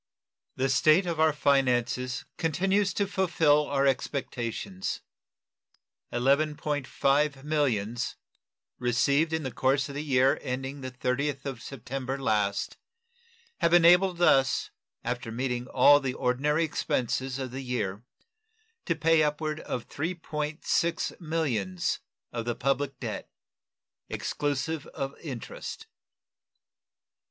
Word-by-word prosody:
The 130 - +1
state 155 +7 +4
of 170 -3 -2
our 160 0 +5
finances 125 -3 +1
continues 190 +5 +1
to 200 - +2
fulfill 165 -6 +2
our 140 -1 +1
expectations. 120 -7 -2 1.1
$11.5 140 +1 +1
millions, 120 -7 0 0.6
received 140 +6 +2
in 160 -1 -1
the 130 - -3
course 135 +4 +1
of - - -6
the 145 +2 -3
year 135 -2 +3
ending 135 +1 -4
the 130 - -4
30th 130 +2 -2
of 135 -5 -5
September 135 +1 -5
last, 105 -7 0 0.8
have 170 +1 +4
enabled 175 +1 +5
us, 135 -5 +3 0.3
after 120 -1 -3
meeting 125 +1 -2
all 145 +3 +6
the 130 -2 -3
ordinary 140 +5 +1
expenses 130 -3 -1
of 130 -2 -4
the 130 +2 -5
year, 105 -6 -2 0.8
to 170 - +1
pay 165 0 +4
upward 150 +1 -1
of 125 -5 -5
$3.6 160 0 -2
millions 125 - -1 0.3
of 115 -1 -4
the 120 -1 -1
public 135 0 -1
debt, - - -5 0.8
exclusive 145 +2 -2
of 135 0 -4
interest. 130 -8 -7
140 Hz, 110 wpm, -28 LUFS, 125-155 Hz, 1.1 s, all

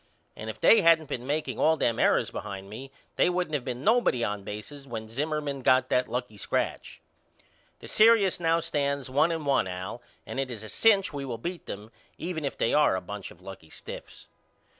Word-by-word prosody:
And - - -7
if - - -7
they 225 - +6
hadn't 165 -3 +4
been 125 0 -4
makeing 150 +2 -2
all 160 +1 +4
them 115 -5 +1
errors - - +3
behind 100 0 -7
me 130 +5 -8 0.3
they - - +4
wouldn't 180 -3 -1
of 140 - -2
been 125 0 -5
nobody 220 - +3
on 105 -2 -2
bases 110 +8 -8
when 110 -3 -6
Zimmerman 145 +1 -2
got 130 +1 +3
that 125 - +2
lucky 125 -4 -4
scratch. - - -2 0.8
The - - -9
serious 215 -4 +5
now 165 0 +2
stands 140 -5 -1
one 150 +5 +3
and 160 -2 -3
one 135 -8 +2
Al 95 +5 -6 0.2
and - - -5
it 135 -1 -1
is 115 -3 -6
a 110 - -8
cinch 200 -6 +3
we 140 -1 -4
will 125 -4 -4
beat 175 +9 -6
them 105 +3 -7 0.3
even 165 -3 -4
if 140 - -3
they - - +1
are 150 -9 +4
a - - -1
bunch 100 +2 -7
of 90 - -16
lucky 95 -4 -10
stiffs. - - -10
135 Hz, 205 wpm, -27 LUFS, 110-160 Hz, 0.8 s, they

